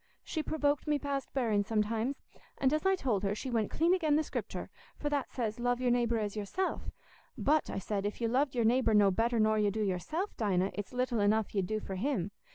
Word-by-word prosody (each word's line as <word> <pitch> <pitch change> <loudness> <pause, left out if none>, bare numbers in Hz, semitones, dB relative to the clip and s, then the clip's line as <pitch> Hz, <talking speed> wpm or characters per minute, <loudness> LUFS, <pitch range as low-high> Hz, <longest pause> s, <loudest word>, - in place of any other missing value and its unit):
She 315 - -2
provoked 295 -1 0
me 300 -1 +2
past 280 -1 -3
bearing 225 -6 +1
sometimes; 225 +5 -1 0.3
and, 270 +1 +2
as 310 +5 +1
I 385 - +4
told 240 - 0
her, 200 0 0
she 260 +4 -5
went 225 -3 +1
clean 335 +3 +2
again' 315 -5 +2
the 310 - +3
Scriptur', - - -5 0.3
for 295 - -2
that 285 -3 -1
says, 225 -3 -3
'Love 245 0 +1
your 250 -1 +2
neighbour 235 -1 +2
as 210 -1 -2
yourself'; 215 - -2 0.5
'but,' 305 +1 +2
I - - -3
said, 195 +1 -2
'if 205 - -5
you 230 - +1
loved 265 +3 +1
your 235 -2 +2
neighbour 235 -1 +3
no 205 -2 +6
better 230 +4 +1
nor 215 0 +3
you 210 -1 +3
do 215 +2 -1
yourself, 210 - -2
Dinah, 195 -3 +1
it's 205 -1 -5
little 250 -2 0
enough 210 +1 +2
you'd 195 -3 0
do 215 +2 -1
for 190 -2 -6
him. 205 -4 -1
235 Hz, 225 wpm, -32 LUFS, 210-280 Hz, 0.5 s, no